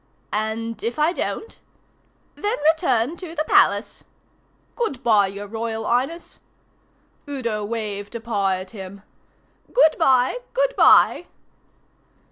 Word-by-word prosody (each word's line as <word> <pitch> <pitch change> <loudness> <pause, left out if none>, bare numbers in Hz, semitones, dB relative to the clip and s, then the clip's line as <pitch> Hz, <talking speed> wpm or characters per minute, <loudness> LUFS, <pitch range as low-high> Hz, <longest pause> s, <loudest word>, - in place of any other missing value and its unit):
"And 220 +2 -3
if 235 +4 -3
I 310 +3 +2
don't?" 445 - -4 0.7
"Then 420 +3 -2 0.2
return 315 -3 0
to 335 -2 -8
the 305 - 0
Palace." - - +2 0.7
"Good 280 - -3
bye, 215 -4 +4
your 200 +1 -7
Royal 225 +1 -4
Highness." 270 +8 -2 0.9
Udo 235 -7 -3
waved 205 -1 -4
a - - -3
paw 210 -4 -1
at 185 0 -5
him. 195 -1 -10 0.7
"Good 320 -11 +4
bye, 260 - +3 0.2
good - - +1
bye." 350 - +5
230 Hz, 115 wpm, -22 LUFS, 210-315 Hz, 0.9 s, bye